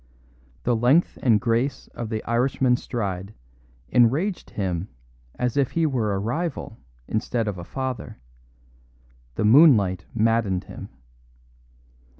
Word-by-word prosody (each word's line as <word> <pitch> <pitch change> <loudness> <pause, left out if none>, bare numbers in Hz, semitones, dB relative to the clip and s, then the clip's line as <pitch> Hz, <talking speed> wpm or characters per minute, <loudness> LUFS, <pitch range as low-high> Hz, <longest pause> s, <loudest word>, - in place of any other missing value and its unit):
The 120 - +2
length 125 +9 +2
and 115 -5 +4
grace 120 +4 -1
of 120 -2 -6
the 110 -1 -3
Irishman's 125 +1 +1
stride 100 -3 -4 0.5
enraged 140 - +2
him 95 -2 -3 0.5
as 125 +1 -2
if 140 -3 +1
he 165 -1 +2
were 115 -9 0
a - - -1
rival 120 - -3 0.3
instead 115 +1 -1
of 100 -3 -3
a - - -6
father; 130 +6 -5 1.2
the - - 0
moonlight 105 - +5
maddened 110 -4 +1
him. - - -10
115 Hz, 120 wpm, -24 LUFS, 105-130 Hz, 1.2 s, moonlight